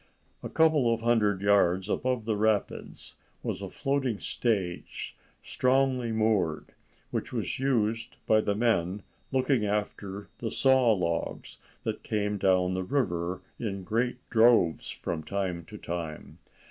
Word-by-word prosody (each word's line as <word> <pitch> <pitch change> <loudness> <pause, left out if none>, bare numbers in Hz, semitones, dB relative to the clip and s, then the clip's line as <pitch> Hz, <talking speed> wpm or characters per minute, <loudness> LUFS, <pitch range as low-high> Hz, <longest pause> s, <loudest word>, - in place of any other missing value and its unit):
A - - -5
couple 155 -7 +4
of 115 0 0
hundred 105 -4 +2
yards 95 -2 +3
above 125 +1 -1
the 110 -1 0
rapids 105 0 -1 0.3
was - - -3
a - - -5
floating 135 -5 -1
stage, 100 -6 -2 0.3
strongly 130 -2 +1
moored, 110 -7 0 0.4
which - - -3
was - - -2
used 115 -3 0
by 110 0 +4
the 100 -1 0
men 105 -4 +1 0.3
looking 130 -3 +2
after 100 -1 -3
the 115 - -2
saw 130 -1 +4
logs 85 -5 -2 0.2
that - - -3
came 105 -1 -1
down 95 -1 +3
the 95 - -1
river 90 -7 -1 0.2
in 100 -4 -3
great 120 +6 0
droves 110 -8 +4
from 80 -2 -4
time 90 -1 -3
to 105 - -10
time. 85 -5 -6
105 Hz, 135 wpm, -28 LUFS, 95-120 Hz, 0.4 s, couple